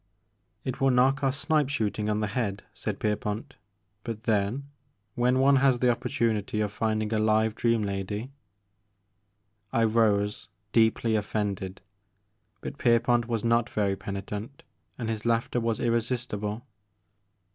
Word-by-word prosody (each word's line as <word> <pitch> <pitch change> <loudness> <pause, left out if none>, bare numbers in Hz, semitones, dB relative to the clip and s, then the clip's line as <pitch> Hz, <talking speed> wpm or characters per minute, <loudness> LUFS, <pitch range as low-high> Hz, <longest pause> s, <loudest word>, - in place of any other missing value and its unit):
"It 130 0 -4
will 135 - +5
knock 135 +2 +3
our 135 - +3
snipe 145 0 +1
shooting 105 -6 -1
on 105 0 0
the - - +1
head," 105 -5 -2
said - - -4
Pierpont, 105 +4 -2 0.5
"but 115 -2 -5
then 110 +5 0 0.5
when 125 +1 +2
one 135 +1 +5
has 135 -1 +4
the 125 0 +3
opportunity 110 -3 -1
of 105 -1 0
finding 110 0 -1
a 110 - +2
live 110 0 +3
dream 115 -1 +1
lady 100 +5 -3 0.5
' 100 0 -47
' 100 0 -47
I 115 - +2
rose, 105 -2 +2 0.2
deeply 110 0 +3
ofiended, 100 -3 -2 0.8
but 140 - -7
Pierpont 120 0 +3
was 115 -3 -1
not 115 0 +2
very 100 -2 0
penitent 100 +6 -6 0.3
and 115 - -4
his 110 -2 -3
laughter 115 +1 +1
was 115 -2 -1
irresistible. 115 -2 -1
110 Hz, 140 wpm, -27 LUFS, 105-120 Hz, 0.8 s, will